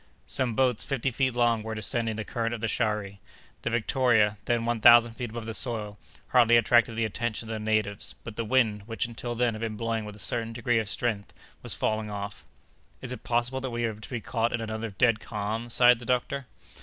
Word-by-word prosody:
Some 125 Hz, -4 st, -2 dB
boats, 125 Hz, -2 st, +2 dB
fifty 135 Hz, -1 st, -1 dB
feet 130 Hz, 0 st, 0 dB
long, 120 Hz, -2 st, +2 dB
were 110 Hz, +1 st, -5 dB
descending 110 Hz, +1 st, -1 dB
the 110 Hz, -1 st, -4 dB
current 115 Hz, +1 st, -2 dB
of 110 Hz, -, -9 dB
the 115 Hz, -, 0 dB
Shari. 105 Hz, -3 st, -1 dB, 0.4 s
The -, -, -1 dB
Victoria, 115 Hz, -3 st, +2 dB
then 120 Hz, -1 st, 0 dB
one 120 Hz, -1 st, -1 dB
thousand 120 Hz, 0 st, +7 dB
feet 120 Hz, 0 st, -5 dB
above 115 Hz, 0 st, -6 dB
the 115 Hz, -, -4 dB
soil, 110 Hz, -4 st, 0 dB, 0.3 s
hardly 120 Hz, -2 st, +6 dB
attracted 115 Hz, 0 st, +4 dB
the 115 Hz, 0 st, +1 dB
attention 115 Hz, +1 st, -3 dB
of 110 Hz, -, -4 dB
the 110 Hz, -, -3 dB
natives; 105 Hz, -1 st, -1 dB
but 115 Hz, -, -8 dB
the 115 Hz, -, -2 dB
wind, 110 Hz, -3 st, +1 dB
which 115 Hz, 0 st, -2 dB
until 120 Hz, +1 st, -5 dB
then 120 Hz, -1 st, +1 dB
had 110 Hz, -, -7 dB
been 110 Hz, -2 st, -3 dB
blowing 115 Hz, 0 st, -1 dB
with 105 Hz, -1 st, -8 dB
a -, -, -13 dB
certain 115 Hz, +3 st, -2 dB
degree 120 Hz, 0 st, +1 dB
of 110 Hz, -2 st, -3 dB
strength, 105 Hz, -2 st, -2 dB, 0.3 s
was -, -, -4 dB
falling 110 Hz, 0 st, -1 dB
off. 100 Hz, 0 st, -6 dB, 0.5 s
"Is 130 Hz, -, -6 dB
it 125 Hz, -, -7 dB
possible 120 Hz, +2 st, 0 dB
that 130 Hz, -, -3 dB
we 120 Hz, 0 st, -3 dB
are 115 Hz, -1 st, 0 dB
to 105 Hz, 0 st, -11 dB
be 120 Hz, -3 st, -4 dB
caught 115 Hz, +1 st, -1 dB
in 120 Hz, -, 0 dB
another 110 Hz, 0 st, -4 dB
dead 110 Hz, +2 st, +2 dB
calm?" 110 Hz, +3 st, -4 dB
sighed 120 Hz, 0 st, +5 dB
the 120 Hz, -, -10 dB
doctor. 130 Hz, +2 st, -1 dB
115 Hz, 220 wpm, -27 LUFS, 110-120 Hz, 0.5 s, thousand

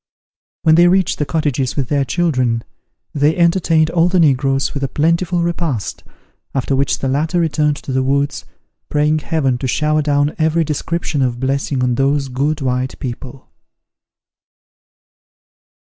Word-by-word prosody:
When 160 Hz, -2 st, +5 dB
they 175 Hz, +2 st, +6 dB
reached 185 Hz, 0 st, +2 dB
the 150 Hz, -, -1 dB
cottages 145 Hz, -5 st, -1 dB
with 135 Hz, -4 st, -2 dB
their 145 Hz, -2 st, +1 dB
children, 130 Hz, -7 st, 0 dB, 0.5 s
they 150 Hz, +2 st, +2 dB
entertained 170 Hz, -2 st, +2 dB
all 170 Hz, 0 st, +3 dB
the 180 Hz, 0 st, +2 dB
negroes 135 Hz, -3 st, +2 dB
with 140 Hz, -, -4 dB
a -, -, +1 dB
plentiful 170 Hz, +4 st, 0 dB
repast, 170 Hz, -, -3 dB, 0.5 s
after 135 Hz, +1 st, 0 dB
which 135 Hz, +1 st, +1 dB
the 135 Hz, -, -3 dB
latter 155 Hz, +6 st, 0 dB
returned 150 Hz, -2 st, +1 dB
to -, -, -5 dB
the 130 Hz, -, +1 dB
woods, 140 Hz, +1 st, 0 dB, 0.5 s
praying 150 Hz, +1 st, +1 dB
Heaven 140 Hz, -6 st, -1 dB
to 130 Hz, -, -2 dB
shower 150 Hz, +4 st, +1 dB
down 145 Hz, 0 st, +1 dB
every 160 Hz, +1 st, +2 dB
description 155 Hz, 0 st, -2 dB
of 125 Hz, -2 st, -1 dB
blessing 135 Hz, 0 st, -1 dB
on 125 Hz, -1 st, +1 dB
those 135 Hz, +2 st, 0 dB
good 145 Hz, +4 st, -1 dB
white 130 Hz, 0 st, -2 dB
people. 130 Hz, +1 st, -8 dB
145 Hz, 145 wpm, -17 LUFS, 135-160 Hz, 0.5 s, they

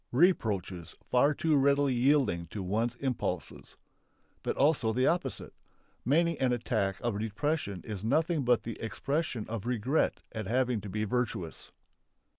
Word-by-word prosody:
Reproaches 105 Hz, -, +1 dB, 0.2 s
for 140 Hz, +4 st, +4 dB
too 160 Hz, -2 st, +2 dB
readily 140 Hz, 0 st, +3 dB
yielding 125 Hz, -, +2 dB
to 100 Hz, +4 st, -5 dB
one's 115 Hz, +6 st, 0 dB
impulses. 130 Hz, -1 st, -4 dB, 0.6 s
But -, -, -2 dB
also 140 Hz, -6 st, +3 dB
the 130 Hz, +3 st, +2 dB
opposite! 175 Hz, +3 st, -1 dB, 0.5 s
Many 165 Hz, +5 st, +2 dB
an 130 Hz, -1 st, +2 dB
attack 100 Hz, -5 st, 0 dB
of 120 Hz, -4 st, -1 dB
depression 110 Hz, -, -2 dB
is 105 Hz, -3 st, -6 dB
nothing 155 Hz, +5 st, +1 dB
but 120 Hz, -1 st, +3 dB
the 115 Hz, -, -6 dB
expression 140 Hz, +1 st, -2 dB
of 115 Hz, 0 st, -5 dB
regret 125 Hz, +5 st, 0 dB
at 110 Hz, -3 st, -5 dB
having 125 Hz, -1 st, +1 dB
to 100 Hz, -, -7 dB
be 105 Hz, +3 st, -2 dB
virtuous. 105 Hz, -7 st, -3 dB
120 Hz, 140 wpm, -30 LUFS, 105-140 Hz, 0.6 s, for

